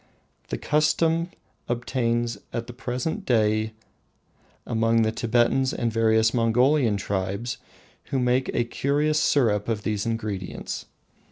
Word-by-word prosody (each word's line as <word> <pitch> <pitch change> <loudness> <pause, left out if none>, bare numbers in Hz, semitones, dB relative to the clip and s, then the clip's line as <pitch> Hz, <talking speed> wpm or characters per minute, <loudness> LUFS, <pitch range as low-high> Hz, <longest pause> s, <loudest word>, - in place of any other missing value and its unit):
The - - -3
custom 160 - +1 0.4
obtains 120 -2 -1
at 115 - -3
the 120 - -9
present 130 - -3
day 110 - +1 0.9
among 115 0 +2
the 110 - +1
Thibetans 120 +3 +1
and 115 -2 -1
various 110 0 +3
Mongolian 120 0 +3
tribes, 100 +4 -3 0.5
who 135 - -2
make 125 +1 +1
a 120 - +3
curious 145 +5 0
syrup 110 -9 +2
of 110 -2 -1
these 105 0 -1
ingredients. 105 -5 -4
115 Hz, 115 wpm, -25 LUFS, 110-130 Hz, 0.9 s, various